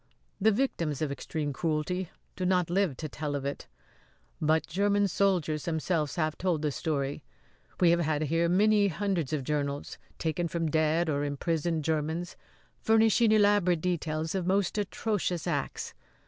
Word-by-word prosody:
The 220 +2 +5
victims 170 - -1
of 145 - -1
extreme 145 +1 -3
cruelty 165 +5 -1 0.3
do 185 - -4
not 180 -2 +2
live 180 -7 +1
to 155 - -4
tell 150 0 -4
of 140 -1 -3
it; 140 - -4 0.7
but 155 +1 +2
German 200 +4 +2
soldiers 175 -5 +1
themselves 160 -2 -1
have 155 -2 -1
told 175 -5 0
the 150 - +1
story. 145 -1 -2 0.6
We 175 -2 +5
have 170 - +3
had 155 -2 0
here 165 +3 +1
many 205 +3 +4
hundreds 190 -5 -1
of 150 -3 -1
journals, 145 0 -3 0.2
taken 165 +2 -1
from 165 -2 -2
dead 160 +2 +2
or 145 -2 0
imprisoned 160 +2 -1
Germans, 160 +3 -2 0.4
furnishing 225 0 +4
elaborate 205 -5 +4
details 160 -3 -1
of 185 -2 -2
most 195 +1 +1
atrocious 200 -4 -2
acts. - - -3
165 Hz, 150 wpm, -29 LUFS, 150-185 Hz, 0.7 s, The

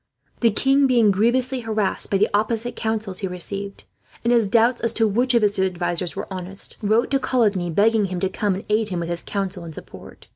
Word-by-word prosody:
The 235 - +4
king, 270 +6 +3
being 235 -5 +4
grievously 250 +6 +1
harassed 220 -4 -1
by 195 - +2
the 210 +2 +3
opposite 225 +3 -1
counsels 220 -4 -2
he 195 - -2
received, 195 +2 -5 0.4
and 235 +1 +2
his 230 -3 +3
doubts 235 +4 +2
as 230 -1 +1
to 225 -1 +2
which 245 +5 +1
of 235 - +3
his 205 -1 +1
advisers 175 -2 -1
were - - -4
honest, 185 +1 -1
wrote 220 +4 +1
to 275 - +2
Coligny; 210 -9 +1
begging 210 +5 +2
him 185 -2 -4
to 190 - +2
come 200 0 -1
and 195 - -7
aid 215 0 +1
him, 180 -2 -3
with 170 - -4
his 170 0 -3
counsel 195 -3 -4
and 165 -2 -9
support. - - -12
210 Hz, 215 wpm, -22 LUFS, 190-230 Hz, 0.4 s, The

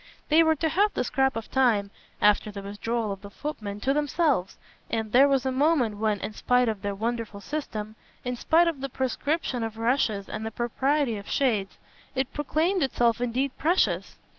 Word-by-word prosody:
They 315 +2 +6
were 320 -1 +4
to 320 +2 0
have 405 +6 +2
the - - +1
scrap 265 +2 +1
of 225 -1 -6
time, 225 -7 +2 0.3
after 210 +1 +4
the 200 -1 -7
withdrawal 215 +2 -2
of 195 -1 -6
the 200 - -9
footman, 210 -5 -6
to 270 - +2
themselves, 290 - 0 0.3
and 220 -1 -2
there 265 +4 +7
was 270 -2 +1
a 260 - +1
moment 260 -6 +2
when, 210 -1 0
in 215 - -4
spite 250 +2 +2
of 215 -3 -2
their 200 -1 -3
wonderful 225 -1 -3
system, 215 -5 -5 0.3
in 250 0 -1
spite 330 +7 +3
of 310 -5 -2
the 275 - -3
proscription 265 +1 -1
of 225 -1 -5
rushes 225 -4 0
and 215 - -5
the 220 - -2
propriety 245 +2 0
of 200 - -9
shades, 220 -8 0 0.4
it 265 0 -1
proclaimed 320 +6 0
itself 240 -4 +1
indeed 255 +3 -1
precious. 345 +5 +1
245 Hz, 190 wpm, -26 LUFS, 215-280 Hz, 0.4 s, there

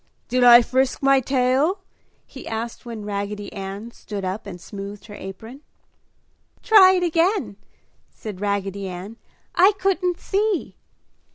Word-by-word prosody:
"Did 250 +1 +2
I 240 0 +9
frisk 260 +3 0
my 275 0 +5
tail?" 265 - +1 0.4
he - - -11
asked 230 +2 -5
when 225 -3 -7
Raggedy 205 0 -4
Ann 200 +3 -7
stood 205 -4 -7
up 195 +3 -4
and 180 -3 -8
smoothed 200 +2 -9
her 210 - -11
apron. 220 +8 -9 1.0
"Try 395 -5 +7
it 365 -1 +1
again!" 335 - +1 0.5
said 205 -4 -9
Raggedy 200 -1 -2
Ann. 185 +5 -8 0.4
"I 380 +4 +5
couldn't 365 -2 0
see!" 410 -2 -1
230 Hz, 130 wpm, -22 LUFS, 200-320 Hz, 1.0 s, I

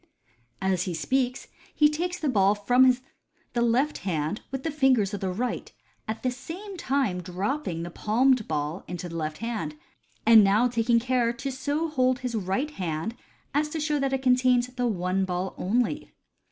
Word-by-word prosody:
As 190 -2 +1
he 180 -3 -3
speaks, 255 - 0 0.3
he 300 - +6
takes 345 +4 -2
the 310 - -1
ball 200 -5 +3
from 250 +4 +4 0.6
the 240 - +1
left 245 +6 +2
hand 165 +1 -2
with 270 0 -5
the 320 - -1
fingers 260 -8 +3
of 205 - -3
the 190 - -1
right, 235 +7 -3 0.4
at 220 +1 -4
the 255 - +1
same 340 +11 -8
time 265 - 0
dropping 185 - -3
the 175 - -6
palmed 240 +4 +2
ball 150 +3 -2
into 180 0 -5
the 170 - -8
left 155 -1 -3
hand, 210 -11 -3 0.5
and 225 -1 +8
now 205 +5 +4
taking 235 0 +2
care 245 -1 +1
to 270 +3 -4
so 285 +5 -1
hold 255 -4 +2
his 250 -2 -3
right 215 +8 -1
hand 180 - -3 0.4
as 300 +2 +1
to 315 - -4
show 300 -1 0
that 275 -1 0
it 265 -1 -1
contains 250 -1 +4
the 250 -1 -1
one 185 -2 0
ball 185 0 -2
only. 245 +9 -1
240 Hz, 180 wpm, -26 LUFS, 190-270 Hz, 0.6 s, and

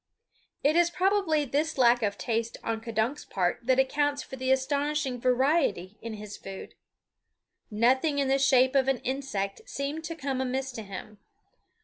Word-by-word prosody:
It 295 +3 +3
is 345 0 +4
probably 345 -3 +1
this 295 +4 -1
lack 240 -1 +5
of 205 -2 -1
taste 230 0 -2
on 225 -1 -2
K'dunk's 230 +5 -1
part 180 -2 -1
that 260 -1 +4
accounts 285 +2 +1
for - - -9
the 260 0 -3
astonishing 280 -1 0
variety 250 - +1
in 230 -1 -5
his 210 -1 -8
food. 195 0 -9 1.0
Nothing 260 +7 +2
in 280 -1 +1
the 270 +1 +2
shape 260 -1 +4
of 270 -1 +3
an 270 -1 +2
insect 245 -7 -3
seemed 285 +3 -4
to 330 +1 -4
come 270 -4 -2
amiss 265 +1 -2
to 230 - -6
him. 205 +1 -9
265 Hz, 160 wpm, -28 LUFS, 230-285 Hz, 1.0 s, lack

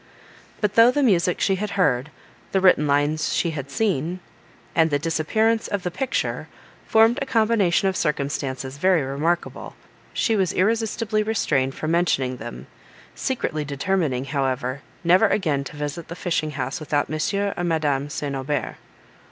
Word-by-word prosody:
But 210 -2 +1
though 230 +2 +7
the 285 +3 +1
music 180 -7 +2
she 195 -1 +2
had 210 +2 -3
heard, 135 -7 +2 0.4
the 190 - +4
written 180 -5 +4
lines 145 +2 +1
she 170 - +1
had 140 -3 -6
seen, 175 0 -1 0.5
and 160 -1 +3
the 145 - +2
disappearance 220 +9 +1
of 200 -3 -3
the 180 - -2
picture, 260 +8 -2 0.4
formed 225 +3 +4
a 275 - -2
combination 215 -6 +2
of 190 - 0
circumstances 140 -2 -2
very 185 -3 +3
remarkable, 150 +6 -2 0.4
she 225 - +1
was 190 -4 +1
irresistibly 220 +1 +1
restrained 140 -12 0
from 155 - -3
mentioning 135 -7 +1
them; 120 - -8 0.5
secretly 160 - -2
determining, 145 -2 -1
however, 135 -1 -2 0.2
never 180 +5 +5
again 155 -10 0
to 150 - -9
visit 150 +3 -4
the 170 - -7
fishing 170 -4 -1
house 135 +4 -3
without 145 -2 0
Monsieur 200 +6 -1
or 175 - -3
Madame 150 -4 0
St. 145 -2 -3
Aubert. 135 +2 -3
165 Hz, 150 wpm, -23 LUFS, 145-200 Hz, 0.5 s, though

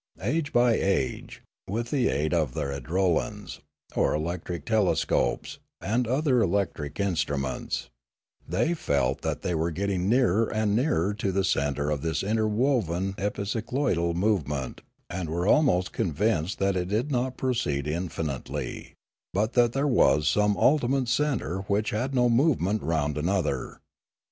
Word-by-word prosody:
Age 145 +7 0
by 120 -1 +4
age, 95 -11 -1 0.3
with 115 +4 -3
the 135 -4 +2
aid 75 +5 0
of 75 -7 0
their 70 - -2
idrolans 85 +5 -1 0.4
or - - +2
electric 85 0 -4
telescopes, 100 - +1 0.2
and 115 +5 0
other 130 0 +2
electric 95 -7 -1
instruments, 75 -8 -1 0.6
they 95 - +1
felt 70 - 0
that - - -3
they 90 - -1
were 80 +1 0
getting 95 +2 -1
nearer 115 -3 +3
and 110 -1 +1
nearer 105 - +1
to 105 -2 -2
the 95 +1 +1
centre 75 -4 0
of 75 -2 -1
this 80 +3 -1
interwoven 105 - +1
epicycloidal 105 - -1
movement 75 - -1 0.3
and 85 -2 -4
were 85 +3 -1
almost 100 - +3
convinced 95 +2 0
that 100 0 +1
it 90 -1 -1
did 115 +9 -1
not 125 0 -1
proceed 115 - -1
in 85 +4 -2
finitely, 75 -6 -5 0.4
but 105 +3 +1
that 120 -1 +3
there 135 +2 0
was 75 - +3
some 105 +4 +2
ultimate 135 0 +2
centre 125 - 0
which 105 +2 0
had 130 +5 -2
no 125 -1 +4
movement 115 - +2
round 75 -2 -1
another. 85 -5 -1
100 Hz, 140 wpm, -27 LUFS, 80-120 Hz, 0.6 s, by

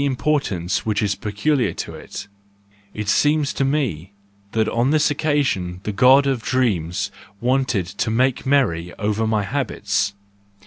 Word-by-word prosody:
importance 130 - 0
which 110 -2 0
is 100 -1 +1
peculiar 120 +8 0
to - - -5
it 100 - -8 0.6
It 105 0 -5
seems 145 +6 +2
to - - 0
me 125 - -1 0.4
that, 110 -1 +1
on 120 +3 +1
this 150 0 +3
occasion, 140 - 0
the 105 - -2
God 130 +6 +6
of 135 -4 0
dreams 100 -7 0 0.3
wanted 125 -5 +1
to 95 +5 -3
make 125 +3 +1
merry 90 -12 +1
over 105 +1 0
my 110 -2 +1
habits,—. 100 -4 -1
115 Hz, 140 wpm, -21 LUFS, 100-135 Hz, 0.6 s, God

